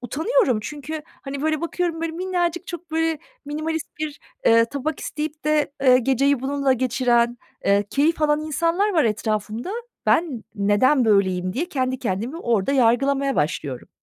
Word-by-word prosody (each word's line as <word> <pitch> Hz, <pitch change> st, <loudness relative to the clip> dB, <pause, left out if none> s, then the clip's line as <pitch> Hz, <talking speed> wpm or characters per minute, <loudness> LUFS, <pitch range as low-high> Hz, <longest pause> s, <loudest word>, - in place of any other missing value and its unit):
utanıyorum. 315 Hz, -, +1 dB
Çünkü, 300 Hz, +3 st, -6 dB, 0.2 s
hani, 275 Hz, 0 st, -5 dB
böyle, 310 Hz, -1 st, 0 dB
bakıyorum, 340 Hz, -1 st, -2 dB
böyle, 330 Hz, -1 st, -2 dB
minnacık 350 Hz, 0 st, -1 dB
çok 345 Hz, -1 st, -8 dB
böyle 325 Hz, -1 st, 0 dB, 0.3 s
minimalist 310 Hz, +2 st, -3 dB
bir, 300 Hz, -2 st, -4 dB, 0.3 s
eee, 230 Hz, 0 st, +6 dB
tabak 280 Hz, +5 st, -4 dB
isteyip 305 Hz, 0 st, -5 dB
de, 300 Hz, -1 st, +1 dB
eee, 255 Hz, -2 st, +6 dB
geceyi 270 Hz, +2 st, +2 dB
bununla 275 Hz, 0 st, +1 dB
geçiren, 245 Hz, -1 st, +1 dB, 0.3 s
eee, 200 Hz, +1 st, +3 dB
keyif 310 Hz, +3 st, +1 dB
alan 295 Hz, 0 st, +3 dB
insanlar 335 Hz, +7 st, 0 dB
var 320 Hz, -6 st, +3 dB
etrafımda. 215 Hz, -, -2 dB, 0.4 s
"Ben 275 Hz, -, +1 dB
neden 210 Hz, +7 st, +3 dB
böyleyim?" 190 Hz, -4 st, +2 dB
diye 275 Hz, -, -1 dB
kendi 260 Hz, -4 st, -1 dB
kendimi 230 Hz, -, -3 dB
orada 235 Hz, -, +1 dB
yargılamaya 275 Hz, +2 st, +2 dB
başlıyorum. 145 Hz, -4 st, -2 dB
280 Hz, 145 wpm, -23 LUFS, 235-315 Hz, 0.4 s, eee